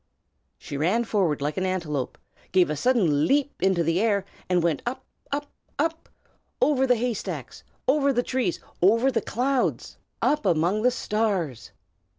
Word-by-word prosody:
She 140 Hz, -, -7 dB
ran 185 Hz, +11 st, +2 dB
forward 185 Hz, -11 st, 0 dB
like 150 Hz, +4 st, -2 dB
an 185 Hz, -, 0 dB
antelope, 155 Hz, -8 st, -2 dB, 0.3 s
gave 180 Hz, -4 st, +4 dB
a -, -, -1 dB
sudden 165 Hz, -, +2 dB
leap 285 Hz, +1 st, +1 dB
into 190 Hz, -3 st, +3 dB
the 165 Hz, +3 st, +1 dB
air, 205 Hz, -3 st, +1 dB, 0.2 s
and 180 Hz, -2 st, +2 dB
went 165 Hz, -5 st, +1 dB
up, 245 Hz, +2 st, -4 dB, 0.3 s
up, 290 Hz, 0 st, -3 dB, 0.3 s
up, 325 Hz, +2 st, -2 dB, 0.5 s
over 265 Hz, -3 st, +3 dB
the 250 Hz, -, +5 dB
haystacks, 235 Hz, -2 st, -4 dB, 0.2 s
over 280 Hz, +1 st, +3 dB
the 245 Hz, -2 st, +1 dB
trees, 255 Hz, -9 st, -1 dB, 0.2 s
over 230 Hz, +8 st, +4 dB
the 230 Hz, -3 st, 0 dB
clouds, 255 Hz, +4 st, -1 dB, 0.2 s
up 300 Hz, 0 st, +1 dB
among 175 Hz, +6 st, +2 dB
the 250 Hz, -, +4 dB
stars. 200 Hz, -, -1 dB
210 Hz, 155 wpm, -25 LUFS, 170-255 Hz, 0.5 s, the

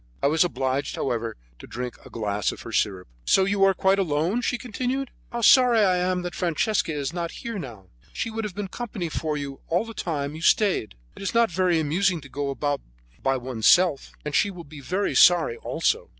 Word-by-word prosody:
I -, -, +3 dB
was 155 Hz, +4 st, +4 dB
obliged; 135 Hz, -4 st, -1 dB
however, 115 Hz, -3 st, -2 dB, 0.2 s
to -, -, -11 dB
drink 125 Hz, 0 st, -5 dB
a -, -, -13 dB
glass 105 Hz, -3 st, -1 dB
of -, -, -10 dB
her -, -, -8 dB
sirup. 95 Hz, -3 st, 0 dB, 0.2 s
"So 190 Hz, -, +4 dB
you 195 Hz, 0 st, +1 dB
are 195 Hz, -1 st, +5 dB
quite 190 Hz, +2 st, +2 dB
alone?" 170 Hz, +6 st, 0 dB
she 245 Hz, -, 0 dB
continued. 255 Hz, +3 st, -3 dB, 0.2 s
"How 240 Hz, 0 st, -3 dB
sorry 245 Hz, -1 st, +6 dB
I 185 Hz, -3 st, +3 dB
am 180 Hz, 0 st, 0 dB
that 175 Hz, -, -4 dB
Francesca 180 Hz, +2 st, 0 dB
is 145 Hz, 0 st, -3 dB
not 170 Hz, -1 st, -3 dB
here 230 Hz, -4 st, -4 dB
now; 115 Hz, -, -9 dB, 0.3 s
she 225 Hz, -, -3 dB
would 225 Hz, 0 st, -3 dB
have 205 Hz, -4 st, -5 dB
been 205 Hz, -1 st, -3 dB
company 205 Hz, -5 st, -5 dB
for 155 Hz, -1 st, -2 dB
you 140 Hz, -1 st, -6 dB
all 175 Hz, +6 st, +1 dB
the 225 Hz, -, -8 dB
time 145 Hz, -7 st, -3 dB
you 160 Hz, -, -8 dB
stayed. 180 Hz, -, +2 dB, 0.2 s
It -, -, -11 dB
is 195 Hz, +3 st, -3 dB
not 230 Hz, -4 st, +4 dB
very 175 Hz, -1 st, +2 dB
amusing 170 Hz, +4 st, +1 dB
to 140 Hz, -, -13 dB
go 140 Hz, 0 st, -3 dB
about 145 Hz, +1 st, -1 dB
all -, -, -31 dB
by 135 Hz, 0 st, +1 dB
oneself, 130 Hz, +6 st, +3 dB
and 150 Hz, -, -4 dB
she 205 Hz, -, +3 dB
will 180 Hz, -3 st, -9 dB
be 150 Hz, -1 st, -12 dB
very 185 Hz, +8 st, -1 dB
sorry 175 Hz, -9 st, +5 dB
also." -, -, -1 dB
170 Hz, 215 wpm, -25 LUFS, 140-200 Hz, 0.3 s, sorry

